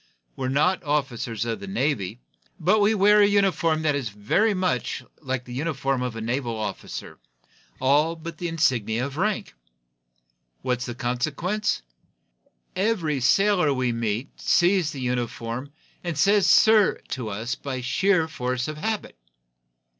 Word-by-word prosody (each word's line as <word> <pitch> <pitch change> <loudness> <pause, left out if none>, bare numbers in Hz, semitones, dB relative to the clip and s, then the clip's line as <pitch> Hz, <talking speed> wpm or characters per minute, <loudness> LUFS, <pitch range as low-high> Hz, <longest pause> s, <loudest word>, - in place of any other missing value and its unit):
We're 130 - -2
not 150 +8 +2
officers 125 -7 -1
of 115 -1 -3
the 100 - -8
Navy, 110 -1 -1 0.4
but 190 +6 +3
we 210 +2 +3
wear 210 +1 +5
a 205 - +6
uniform 185 -6 +2
that 150 -2 +2
is 135 -5 -2
very 115 - +1
much 185 -1 -1 0.2
like 130 -3 -3
the 125 - -9
uniform 135 -2 -1
of 125 -2 -3
a 115 - -5
naval 120 +1 -2
officer, 105 -3 -6 0.6
all 145 +5 +3
but 165 0 -8
the 175 - -2
insignia 125 -8 +1
of 140 0 -6
rank. 205 - -1 1.1
What 125 -1 0
is 125 - -4
the 120 - -5
consequence? 140 - -1 0.9
Every 185 -8 0
sailor 165 +3 +3
we 130 -1 0
meet 115 +2 -3
sees 175 -2 +3
the 140 -3 -6
uniform, 125 +1 -3 0.3
and 170 -4 -3
says 200 +3 +4
'sir' 220 -2 +5
to 125 -4 -4
us 110 +5 -3
by 135 -2 -5
sheer 165 +6 +2
force 125 -3 -2
of 155 0 -5
habit. 215 - -3
140 Hz, 145 wpm, -25 LUFS, 120-180 Hz, 1.1 s, a